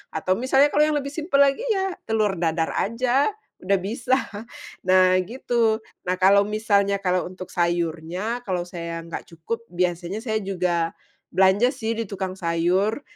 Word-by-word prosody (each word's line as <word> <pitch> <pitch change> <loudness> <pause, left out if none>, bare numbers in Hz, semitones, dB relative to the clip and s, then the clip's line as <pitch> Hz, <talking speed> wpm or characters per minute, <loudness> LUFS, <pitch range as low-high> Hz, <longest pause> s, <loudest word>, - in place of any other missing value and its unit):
atau 185 +4 +1
misalnya 270 +3 +4
kalau 300 - +5
yang 305 - 0
lebih 280 0 -5
simpel 305 -3 0
lagi 275 - +1
ya 385 -2 0
telur 215 -3 +1
dadar 165 -1 0
saja, 250 - +1 0.3
udah 195 +1 +2
bisa. 240 +6 0 0.7
Nah 185 0 +5
gitu, 230 0 0 0.3
nah 180 - +1
kalau 200 +2 +6
misalnya 200 -2 +1
kalau 180 0 +1
untuk 185 0 -9
sayurnya, 175 +6 -1
kalau 180 -2 -1
saya 170 -1 -5
nggak 170 - -6
cukup 230 +8 -5
biasanya 175 +2 -1
saya 220 -3 -1
juga, 175 -3 -1 0.4
belanja 190 +6 +4
sih 230 -3 -2
di 230 - -2
tukang 190 -2 -4
sayur. 180 +8 +1
195 Hz, 150 wpm, -24 LUFS, 180-230 Hz, 0.7 s, kalau